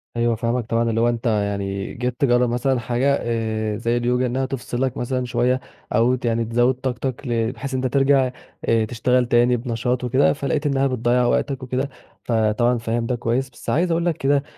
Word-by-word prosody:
أيوه، 120 0 +1
فاهمك 115 +1 -1
طبعًا، 115 +1 0
اللي 115 0 +1
هو 120 - +4
أنت 120 0 -3
يعني 100 -2 -1
جيت 125 0 -4
تجرَّب 120 -2 +3
مثلًا 125 +2 +1
حاجة 125 +4 +1
آآ، 110 -2 -2
زي 115 +2 0
اليوجا 125 +1 +1
إنّها 130 +2 -1
تفصلك 130 -1 -3
مثلًا 125 +1 -2
شويّة، 125 +1 +1 0.4
أو 120 +3 +4
ت 125 - -7
يعني 115 0 +1
تزود 120 +3 +2
طاقتك 130 +1 -4
ل 115 -1 0
بحيث 135 +2 -6
أنت 130 0 0
ترجع 135 0 +3 0.3
آآ 115 -1 +2
تشتغل 125 +2 +1
تاني 120 +1 +3
بنشاط 125 +1 -2
وكده 130 +3 +3
فلقيت 145 +1 -2
إنّها 140 -1 +2
بتضيَّع 125 0 +1
وقتك 135 +2 0
وكده، 130 +2 -2 0.3
فطبعًا 115 +1 +2
فاهم 115 0 -2
ده 125 - -1
كويّس، 120 +3 -1
بس 120 - -9
عايز 170 +9 +2
أقول 170 +1 +1
لك 170 -3 0
كده 140 +1 +2
120 Hz, 190 wpm, -22 LUFS, 115-130 Hz, 0.4 s, هو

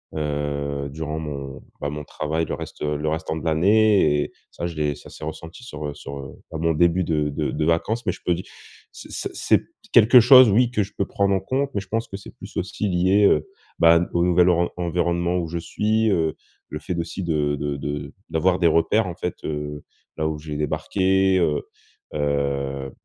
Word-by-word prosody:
heu, 70 -1 -2
durant 80 +1 -4
mon, 70 -3 -6 0.2
bah, 70 - -1
mon 75 +1 -5
travail, 80 +3 -2
le - - -4
reste, - - -9
heu, 75 0 0
le 75 +1 -3
restant 80 0 -2
de 80 - -7
l'année 95 -1 +4
et - - -8 0.2
ça, 85 - -4
je 85 - -7
l'ai 75 -1 0
ça 75 - -13
s'est - - -11
ressenti 80 +8 -8
sur, 75 -11 -6
heu, 70 - -5
sur, 70 0 -8
heu, 70 0 -9 0.2
bah, 80 - -4
mon 80 0 +1
début 85 +3 +3
de 75 -2 0
de 70 - -2
de 75 - -1
vacances 95 +8 0
mais - - +2
je - - -12
peux 90 - +3
dire, 90 - -6 0.5
c - - -12
ce - - -4
c'est - - +2 0.3
quelque 120 +3 +8
chose, 130 0 +8
oui, 120 +4 +4
que 105 -4 +1
je 100 - -9
peux 100 - +1
prendre 100 0 +1
en - - +1
compte 135 +7 -1
mais - - +1
je 95 - -13
pense 115 +2 -1
que 95 - -6
c'est 95 - -13
plus - - -10
aussi 95 +3 -2
lié, 95 +3 +3
heu, 75 -5 +3 0.3
bah, 85 0 +6
au 85 - +2
nouvel 90 0 +4
oren 85 0 +3
environnement 85 0 0
où 85 - -2
je 85 +2 -4
suis, 110 +6 0
heu, 80 -4 +1 0.3
le 75 - -5
fait 90 +2 -4
aussi 85 +3 -4
de 75 -4 0
de 70 0 -3
de 75 0 -5 0.2
d'avoir 90 +3 +1
des 85 - +4
repères, 85 +6 +2
en 90 - -5
fait, 90 -1 -4
heu, 75 -1 -4 0.3
là, 80 0 0
où 80 -1 -2
j'ai 75 -1 -6
débarqué, 95 +5 +1
heu 75 -4 +1 0.5
heu, 70 -2 -1
80 Hz, 215 wpm, -23 LUFS, 75-95 Hz, 0.5 s, quelque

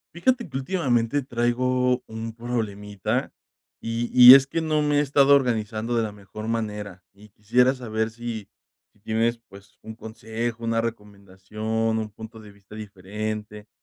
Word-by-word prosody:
Fíjate 240 +2 0
que 130 - -4
últimamente 135 -4 0
traigo 125 0 0
un 110 0 -6
problemita, 105 -4 -3 0.5
y 115 +1 -3
y 125 0 +11
es 135 0 +6
que 165 - -2
no 155 -2 0
me 150 -1 +1
he - - +4
estado 140 0 +4
organizando 115 -3 -1
de 115 - +2
la 110 -2 -3
mejor 105 +1 -9
manera, 105 -5 -4
y 105 +2 -18
quisiera 125 +6 +2
saber 110 -3 -2
si 115 -2 -7 0.4
si - - -31
tienes 115 +2 0
pues 100 0 -16
un 110 - -8
consejo, 115 +1 -5
una 115 0 0
recomendación, 110 +1 -4
un 110 -1 -4
punto 110 +2 -11
de 105 -1 -13
vista 100 0 -18
diferente. 105 +1 -6
115 Hz, 150 wpm, -24 LUFS, 105-125 Hz, 0.5 s, y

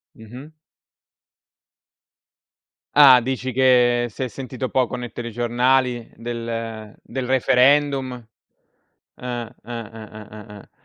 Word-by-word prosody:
Mh-mh. 125 +8 -12 2.4
Ah, 135 -3 +8
dici 130 +1 -3
che 125 -1 +3
si 115 - -6
è - - -2
sentito 130 0 -6
poco 130 -1 0
ne 120 -1 -6
telegiornali 120 +1 -1
del 115 -2 -6
del 130 +1 -5
referendum? 130 +1 +2 1.0
Eh, 120 -1 -5 0.2
eh, 120 0 -6
eh, 110 -1 -10
eh, 105 -1 -11
eh, 105 0 -11
eh. - - -18
125 Hz, 105 wpm, -21 LUFS, 115-130 Hz, 2.4 s, Ah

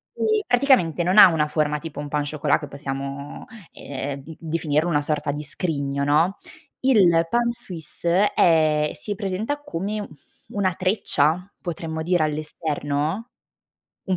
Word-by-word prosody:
Eh, 435 -1 +1
praticamente 245 - +3
non 185 +4 +1
ha - - +11
una 160 -3 +1
forma 150 -1 0
tipo 155 -2 -8
un 145 - -4
pain 150 0 -1
au 145 - -4
chocolat 150 -1 +1
che 150 - -6
possiamo, 140 0 -6 0.3
ehm, 140 0 -6
d 160 +2 -10
definirlo 160 0 0
una 145 -3 +2
sorta 150 -1 -1
di 150 +1 -5
scrigno, 140 -2 -2
no? 155 +7 +2 0.4
Il 185 -11 +4
pain 235 +3 +2
suisse 180 -1 -1
è 155 -3 +3
si 205 - -5
presenta 215 +8 -3
come, 210 - -4
mhmm, - - -6 0.4
una 195 -3 0
treccia, 185 -1 +1
potremmo 160 -2 -4
dire 175 0 +2
all'esterno? 155 - -2 0.7
Un 190 -2 0
160 Hz, 150 wpm, -23 LUFS, 150-190 Hz, 0.7 s, ha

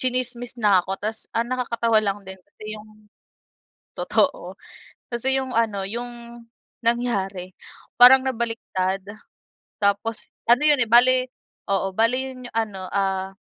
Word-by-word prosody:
tsinismis 250 -1 -2
na 205 -4 +4
ako. 190 +1 -4
Tapos, 220 +2 -4
ang 230 +1 +1
nakakatawa 235 -3 +1
lang 200 -1 -1
din 190 0 -10
kasi 215 +3 -10
'yong 215 0 -13 0.9
totoo. - - -1 0.5
Kasi 260 +3 0
'yong 265 -1 -2
ano 220 -4 0
'yong 235 +3 -7 0.4
nangyari, 200 -6 -1 0.5
parang 260 +2 +9
nabaliktad. 225 -6 -2 0.8
Tapos, 200 +3 +1 0.3
ano 240 +3 +5
'yon, 295 -3 +4
eh, 235 - +1
bale 245 +3 +6 0.5
oo, 195 -1 +1
bale 225 +5 +2
'yon 260 -1 -6
'yong - - -25
ano, 215 -4 -2
ah, 195 -1 -1
230 Hz, 130 wpm, -23 LUFS, 200-245 Hz, 0.9 s, parang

